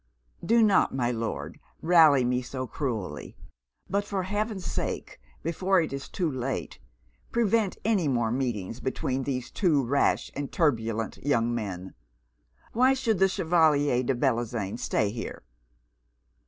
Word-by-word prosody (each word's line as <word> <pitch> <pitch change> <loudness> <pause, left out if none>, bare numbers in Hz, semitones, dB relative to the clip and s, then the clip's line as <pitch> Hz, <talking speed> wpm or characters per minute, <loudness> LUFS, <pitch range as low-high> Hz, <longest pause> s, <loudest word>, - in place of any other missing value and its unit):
'Do 230 0 +4
not, 200 -9 +3
my 125 -2 +1
Lord, 115 -1 -4 0.2
rally 160 -6 +6
me 125 +1 +1
so 130 +1 -5
cruelly; 120 - -4 0.5
but 200 +1 0
for 200 -2 -3
Heaven's 205 0 -2
sake, - - -4 0.2
before 185 +4 +2
it 160 -4 -1
is 140 0 -6
too 180 - -1
late, 130 0 -4 0.5
prevent 225 -3 +1
any 205 -8 +2
more 120 -4 +1
meetings 120 -4 -2
between 130 0 -2
these 125 -3 -3
two 150 -9 +2
rash 140 +4 +1
and 140 0 -4
turbulent 115 -8 0
young 120 -5 +1
men. 95 -5 -5 0.8
Why 255 +3 +4
should 225 -7 0
the 195 - +6
Chevalier 155 -7 +2
de 130 +1 0
Bellozane 120 -4 -1
stay 105 -1 0
here?' 115 +1 -6
140 Hz, 135 wpm, -27 LUFS, 120-185 Hz, 0.8 s, rally